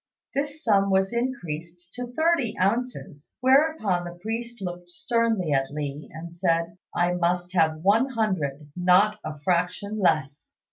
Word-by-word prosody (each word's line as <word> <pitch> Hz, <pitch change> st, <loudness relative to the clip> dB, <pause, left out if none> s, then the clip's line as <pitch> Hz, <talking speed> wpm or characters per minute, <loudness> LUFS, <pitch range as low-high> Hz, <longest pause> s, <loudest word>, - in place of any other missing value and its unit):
This 285 Hz, +2 st, -3 dB
sum 200 Hz, -3 st, +3 dB
was 190 Hz, +3 st, +2 dB
increased 175 Hz, -8 st, -4 dB
to 245 Hz, 0 st, -5 dB
thirty 315 Hz, -6 st, +1 dB
ounces, 195 Hz, -, -2 dB
whereupon 260 Hz, -, +3 dB
the 175 Hz, 0 st, -8 dB
priest 230 Hz, +4 st, -4 dB
looked 175 Hz, -2 st, -6 dB
sternly 225 Hz, -3 st, 0 dB
at 135 Hz, -1 st, +1 dB
Li 145 Hz, 0 st, -5 dB
and 165 Hz, +1 st, -8 dB
said, 170 Hz, -1 st, 0 dB, 0.2 s
"I 175 Hz, 0 st, +2 dB
must 175 Hz, +1 st, 0 dB
have 160 Hz, -3 st, +2 dB
one 220 Hz, +7 st, +4 dB
hundred; 160 Hz, -, -2 dB
not 185 Hz, +4 st, +4 dB
a 150 Hz, -1 st, -6 dB
fraction 180 Hz, +5 st, 0 dB
less." 155 Hz, -6 st, 0 dB
180 Hz, 140 wpm, -25 LUFS, 170-230 Hz, 0.2 s, one